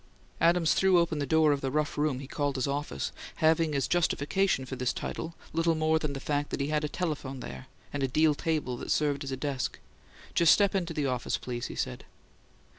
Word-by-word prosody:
Adams 170 Hz, -1 st, +4 dB
threw 190 Hz, -1 st, +4 dB
open 170 Hz, -3 st, +1 dB
the 140 Hz, -, -1 dB
door 160 Hz, +1 st, +4 dB
of 140 Hz, -1 st, 0 dB
the 135 Hz, -, -1 dB
rough 150 Hz, +2 st, -1 dB
room 150 Hz, -3 st, +1 dB
he 135 Hz, -, -7 dB
called 145 Hz, 0 st, -2 dB
his 130 Hz, -, 0 dB
office, 140 Hz, -, -2 dB, 0.2 s
having 160 Hz, -1 st, +3 dB
as 135 Hz, -2 st, +1 dB
justification 175 Hz, -2 st, +1 dB
for 130 Hz, -, -5 dB
this 125 Hz, -1 st, 0 dB
title 165 Hz, +1 st, -5 dB, 0.2 s
little 165 Hz, 0 st, +2 dB
more 155 Hz, 0 st, +2 dB
than 150 Hz, -3 st, -2 dB
the 135 Hz, -, -4 dB
fact 145 Hz, +1 st, -1 dB
that -, -, -3 dB
he 140 Hz, +1 st, -1 dB
had 150 Hz, 0 st, 0 dB
a 150 Hz, -, -1 dB
telephone 145 Hz, -7 st, -3 dB
there 65 Hz, -, -8 dB, 0.3 s
and 145 Hz, -, -2 dB
a 135 Hz, -, +2 dB
deal 155 Hz, +4 st, +3 dB
table 150 Hz, -4 st, -1 dB
that -, -, -7 dB
served 145 Hz, -1 st, +1 dB
as 135 Hz, -, -5 dB
a 130 Hz, -, -2 dB
desk. 135 Hz, -1 st, -2 dB, 0.6 s
"Just 170 Hz, -2 st, +6 dB
step 200 Hz, -2 st, +3 dB
into 180 Hz, -4 st, -1 dB
the 150 Hz, -, 0 dB
office, 125 Hz, -3 st, -1 dB
please," 120 Hz, -1 st, -4 dB
he -, -, -8 dB
said. 65 Hz, -, -3 dB
150 Hz, 220 wpm, -29 LUFS, 135-160 Hz, 0.6 s, Just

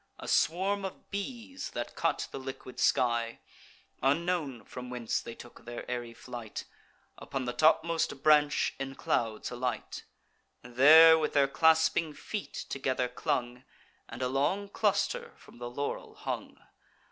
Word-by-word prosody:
A -, -, -9 dB
swarm 195 Hz, +4 st, +2 dB
of 190 Hz, -, -7 dB
bees, 240 Hz, +6 st, -5 dB
that -, -, -4 dB
cut -, -, 0 dB
the -, -, -5 dB
liquid 130 Hz, -1 st, -8 dB
sky, 120 Hz, -3 st, +2 dB, 0.6 s
Unknown 145 Hz, -2 st, 0 dB
from 125 Hz, -1 st, -8 dB
whence 120 Hz, -2 st, -2 dB
they 115 Hz, -, -8 dB
took 120 Hz, -, -13 dB
their 120 Hz, 0 st, -7 dB
airy 120 Hz, -1 st, -4 dB
flight, 120 Hz, -3 st, -7 dB, 0.5 s
Upon 135 Hz, -2 st, -4 dB
the 120 Hz, -, -2 dB
topmost 160 Hz, 0 st, +2 dB
branch 150 Hz, -1 st, +4 dB
in 135 Hz, 0 st, -4 dB
clouds 115 Hz, -3 st, -1 dB
alight; 125 Hz, 0 st, -4 dB, 0.6 s
There 155 Hz, +7 st, +8 dB
with 155 Hz, -, -1 dB
their 140 Hz, -2 st, +4 dB
clasping 160 Hz, +2 st, +3 dB
feet 210 Hz, -2 st, -5 dB
together 130 Hz, -2 st, -1 dB
clung, 125 Hz, -1 st, -2 dB, 0.5 s
And 120 Hz, +3 st, -5 dB
a -, -, +1 dB
long 145 Hz, +10 st, 0 dB
cluster 480 Hz, -, 0 dB
from -, -, -17 dB
the 120 Hz, 0 st, -5 dB
laurel 140 Hz, +4 st, -4 dB
hung. -, -, -5 dB
135 Hz, 135 wpm, -30 LUFS, 125-160 Hz, 0.6 s, There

